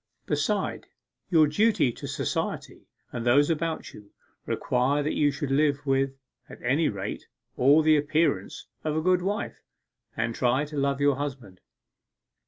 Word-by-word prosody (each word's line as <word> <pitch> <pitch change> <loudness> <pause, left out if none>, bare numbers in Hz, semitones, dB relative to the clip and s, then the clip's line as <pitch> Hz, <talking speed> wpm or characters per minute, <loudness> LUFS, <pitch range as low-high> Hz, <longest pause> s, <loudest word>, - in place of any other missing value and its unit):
'Besides, 160 +7 -1 0.4
your 160 -4 +5
duty 195 - +2
to - - -8
society, - - -4 0.2
and 120 - -4
those 140 +6 +4
about 165 0 -3
you, 105 -1 -14 0.4
requires 135 +4 0
that 150 - -1
you 145 - +3
should 140 0 -4
live 140 0 +1
with 135 0 0 0.3
(at - - -11
any 140 +6 +2
rate) 100 0 -5 0.3
all 145 +5 +5
the 155 0 +5
appearance 155 +3 0 0.2
of 155 0 -1
a - - +1
good 180 0 +3
wife, 200 +3 -3 0.6
and 115 +1 -1
try 130 +4 +1
to 150 0 -9
love 140 -1 0
your 140 -2 +3
husband. 130 -10 -6
145 Hz, 150 wpm, -26 LUFS, 130-155 Hz, 0.6 s, your